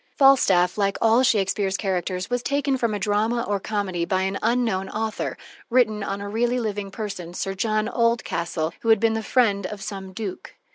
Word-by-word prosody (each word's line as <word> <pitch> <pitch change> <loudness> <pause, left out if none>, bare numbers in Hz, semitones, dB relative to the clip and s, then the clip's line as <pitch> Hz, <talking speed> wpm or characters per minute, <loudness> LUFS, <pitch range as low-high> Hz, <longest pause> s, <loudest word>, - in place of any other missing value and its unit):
Falstaff, 205 -10 +4
like 200 0 +1
all 225 +2 +4
Shakespeare's 200 -5 +1
characters, 185 -2 -2
was 245 0 -1
taken 280 +1 0
from 235 -4 0
a - - -1
drama 215 +4 0
or 205 -4 -1
comedy 195 -4 -2
by 185 +2 0
an 195 +1 -2
unknown 225 -5 0
author, 220 0 -3 0.3
written 230 -4 +2
on 200 0 -3
a 200 - -5
really 240 +4 0
living 205 -3 -3
person, 190 -5 -6
Sir 195 - -2
John 215 +2 0
Oldcastle, 220 -9 0
who 230 - -1
had 220 -2 +6
been 225 +1 +2
the 225 - -1
friend 205 -4 +2
of 210 +1 -7
some 195 -2 -6
duke. 195 -1 -6
210 Hz, 185 wpm, -24 LUFS, 195-230 Hz, 0.3 s, had